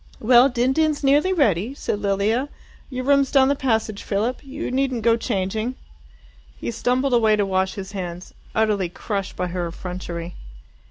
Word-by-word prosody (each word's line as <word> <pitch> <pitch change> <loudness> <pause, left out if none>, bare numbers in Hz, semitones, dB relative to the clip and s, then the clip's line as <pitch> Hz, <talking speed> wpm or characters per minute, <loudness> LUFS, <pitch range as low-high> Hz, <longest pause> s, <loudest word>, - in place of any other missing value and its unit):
"Well, 245 +3 +6
din 245 +1 +1
din's 310 -1 +1
nearly 290 +7 +4
ready," 250 - +1
said 205 - -3
Lilia. 205 +7 0 0.4
"Your 255 -1 -4
room's 280 -1 +4
down 270 -2 +5
the 285 - +2
passage, 220 -6 -1
Philip. 220 +5 -2
You 275 0 -5
needn't 260 -3 0
go 230 -1 +5
changing." 220 +2 -2 0.8
He 120 - -4
stumbled 255 - 0
away 220 -3 +4
to 205 -1 +1
wash 190 0 0
his 195 -1 -7
hands, 180 -3 -6 0.2
utterly 210 -5 +1
crushed 195 +1 -4
by 180 0 -2
her 175 -1 -2
effrontery. 175 0 -6
220 Hz, 160 wpm, -22 LUFS, 190-265 Hz, 0.8 s, Well